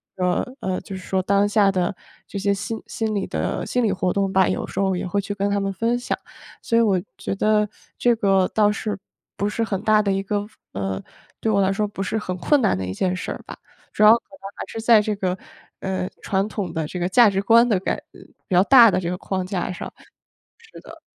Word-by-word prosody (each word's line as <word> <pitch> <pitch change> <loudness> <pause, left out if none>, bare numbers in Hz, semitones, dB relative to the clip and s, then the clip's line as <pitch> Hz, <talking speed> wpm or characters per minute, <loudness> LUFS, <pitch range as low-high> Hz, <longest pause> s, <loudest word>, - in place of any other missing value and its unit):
呃， 180 -1 +1 0.2
呃， 185 -1 -2
就 195 - -8
是 185 - -7
说 190 -1 0
当 200 +2 +2
下 205 -1 +3
的 185 0 -1 0.3
这 200 - -5
些 200 +1 +1
心 220 +3 -4
心 220 -1 -2
理 195 -2 -1
的 - - -2
心 250 -1 0
理 215 - +2
活 185 -1 0
动 195 -1 0
吧， 190 -1 +4
有 - - -1
时 190 - -6
候 190 -1 +1
也 180 - -3
会 200 +2 -1
去 205 +1 -5
跟 200 0 0
他 200 - +1
们 195 0 -1
分 230 +5 0
享。 - - -2 0.4
所 230 - -1
以 - - +5
我 195 -5 +3 0.2
觉 195 - -3
得 210 +1 +2 0.3
这 240 -1 +3
个 195 -3 +3
倒 210 -1 +2
是， 215 0 -3 0.4
不 200 - 0
是 225 +2 -1
很 195 -4 -2
大 215 -1 +4
的 200 -1 0
一 195 0 0
个 205 +1 -2 0.2
呃， 95 0 -3 0.4
对 220 - 0
我 200 -1 +3
来 190 0 +2
说 210 +1 0
不 200 -1 -7
是 220 +3 -1
很 185 -4 -3
困 285 +8 +2
难 215 - +2
的 95 - -3
一 95 0 -4
件 185 - 0
事 - - -5
儿 - - -5
吧， - - -8 0.4
主 - - -4
要 215 +1 +9
可 230 - +6 0.2
能 195 - -7
还 - - -5
是 225 - -6
在 225 -1 +5
这 210 0 -2
个， 185 -2 -1 0.4
呃， 185 -1 -2
传 195 +1 0
统 205 -5 -4
的 160 -2 -2
这 180 - -6
个 175 +1 -1
价 235 +3 +6
值 195 - 0
观 230 +4 +5
的 205 -5 +2
改 - - -1 0.2
呃， - - -15 0.3
比 - - -4
较 180 - +7
大 235 -2 +8
的 185 - +1
这 170 -1 -3
个 180 - -3
框 190 -1 -3
架 185 -1 -2
上。 - - -7
是 - - -20 0.8
的。 - - -13
200 Hz, 265 characters per minute, -22 LUFS, 185-215 Hz, 0.8 s, 要